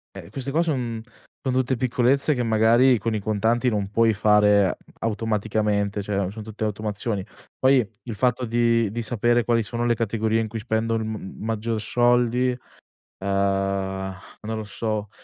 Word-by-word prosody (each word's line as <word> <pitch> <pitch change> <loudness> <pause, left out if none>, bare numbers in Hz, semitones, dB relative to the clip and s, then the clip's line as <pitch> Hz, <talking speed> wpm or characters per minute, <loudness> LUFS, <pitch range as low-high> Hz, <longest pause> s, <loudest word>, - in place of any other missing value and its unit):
Eh, - - -9
queste 135 0 -4
qua 160 +4 +2
son 125 -8 -2 0.4
son 130 -2 0
tutte 130 0 +1
piccolezze, 130 +4 +2
che 125 - -1
magari 115 +3 +4
con 115 0 -2
i - - 0
contanti 110 +4 +1
non 105 -4 -1
puoi 115 +1 +3
fare 105 -2 +4 0.2
automaticamente, 105 -2 0
cioè 100 -2 -2
son 110 +1 -8
tutte 110 0 -8
automazioni. 105 -1 -2 0.3
Poi 130 -2 +4 0.2
il 115 - -5
fatto 125 +3 +1
di 115 -2 +2
di 115 +3 -4
sapere 120 +1 +1
quali 115 -1 +2
sono 115 +4 -3
le 120 - +3
categorie 110 0 0
in 115 - -1
cui 115 +1 -5
spendo 115 0 0
m 110 -3 -5
maggior 110 0 -2
soldi, 120 +1 +2 0.7
ehm, 95 -1 -1 0.3
non 110 - -2
lo 110 - -4
so, 105 +2 -3
110 Hz, 160 wpm, -24 LUFS, 105-120 Hz, 0.7 s, magari